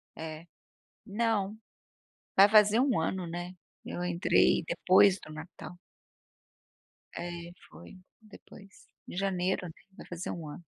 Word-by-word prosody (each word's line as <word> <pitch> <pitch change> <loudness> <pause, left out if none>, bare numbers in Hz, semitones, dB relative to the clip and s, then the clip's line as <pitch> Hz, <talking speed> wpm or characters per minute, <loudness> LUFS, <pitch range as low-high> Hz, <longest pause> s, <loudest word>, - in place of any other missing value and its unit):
É, 160 0 -7 0.6
não, 210 -1 -1 0.8
vai 195 +2 +8
fazer 215 +2 +6
1 255 -9 +2
ano, 180 +2 -2
né, 175 +2 -6 0.3
eu 175 - -5
entrei 175 +2 +3
depois 190 +1 +4
do 155 - -11
Natal. 165 +3 -10 1.4
É, 175 0 -6 0.2
foi 185 - -14 0.2
depois, 200 -2 -16 0.2
em - - -8
janeiro, 185 -1 -1 0.3
vai - - -11
fazer 175 0 -5
1 165 -3 -6
ano. 160 - -10
185 Hz, 115 wpm, -30 LUFS, 175-200 Hz, 1.4 s, vai